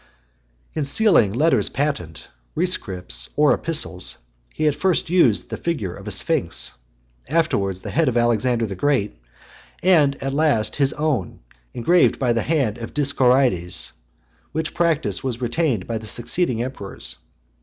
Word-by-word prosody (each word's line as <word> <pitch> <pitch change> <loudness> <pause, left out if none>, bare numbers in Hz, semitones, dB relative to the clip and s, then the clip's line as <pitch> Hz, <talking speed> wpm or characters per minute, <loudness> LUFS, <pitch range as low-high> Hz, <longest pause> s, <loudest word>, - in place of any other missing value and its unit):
L. - - -2
In - - +1
sealing 140 - +4
letters 130 -2 +2
patent, 130 - -3 0.3
rescripts, 95 - -2
or 150 0 +4
epistles, 150 - -1 0.3
he 155 - -1
at 150 - +3
first 180 +1 0
used 150 - +3
the - - -3
figure 115 - -3
of - - -11
a - - -3
sphinx, - - 0 0.6
afterwards 100 - 0
the - - -5
head 165 0 +2
of 120 - -1
Alexander 120 0 +2
(111) - - -7
the 95 - -7 0.3
Great, - - -29 0.6
and 150 -7 +3
at 135 0 -2
last 140 -8 +1
his 140 -2 +2
own, 145 - -2 0.4
engraved 170 +9 +3
by 125 -3 +1
the 115 - 0
hand 130 -8 0
of 115 - -8
Dioscorides; 130 -10 +2 0.6
which 160 0 -2
practice 165 -4 0
was 125 -3 -3
retained 125 - 0
by 115 -1 -3
the 110 - -9
succeeding 120 - 0
emperors. 125 -6 -6
130 Hz, 150 wpm, -22 LUFS, 110-155 Hz, 0.6 s, sealing